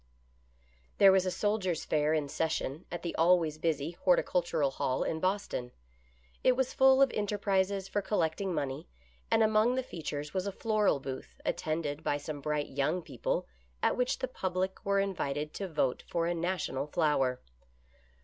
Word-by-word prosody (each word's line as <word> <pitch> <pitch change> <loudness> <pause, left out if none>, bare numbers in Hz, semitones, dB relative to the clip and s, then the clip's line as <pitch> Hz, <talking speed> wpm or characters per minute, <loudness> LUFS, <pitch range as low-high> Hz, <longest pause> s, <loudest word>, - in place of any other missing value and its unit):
HERE 195 -1 +8
was 190 -1 +3
a - - +3
Soldiers' 190 -3 -1
Fair 150 0 +1
in 150 -2 0
session 155 0 -2
at 175 0 -5
the 170 - -2
^ - - +4
always 165 -3 +3
busy 155 -1 0
Horticultural 175 -4 +1
Hall 130 -1 -1
in 160 - -2
Boston. 185 -9 -1 0.7
It 255 - +5
was 260 0 -1
full 265 0 +6
of 270 - +2
enterprises 200 -2 0
for 205 - -1
collecting 190 -1 0
money, 145 -2 -3 0.4
and 225 - +4
among 220 +3 +3
the 260 - 0
features 150 - -5
was 185 +1 -1
a - - -1
floral 210 -6 +1
booth, 135 -1 -7
attended 155 -1 -2
by 145 - +1
some 145 0 -6
bright 150 0 -1
young 150 +6 0
people, 135 -8 -2 0.4
at - - +3
which 250 0 0
the 260 - -2
public 190 -5 -3
were 200 0 +2
invited 150 -7 -2
to 195 - -4
vote 150 -7 0
for 170 -1 0
a 175 - +1
National 170 -5 -2
Flower. 145 -6 +1
170 Hz, 165 wpm, -31 LUFS, 150-195 Hz, 0.7 s, HERE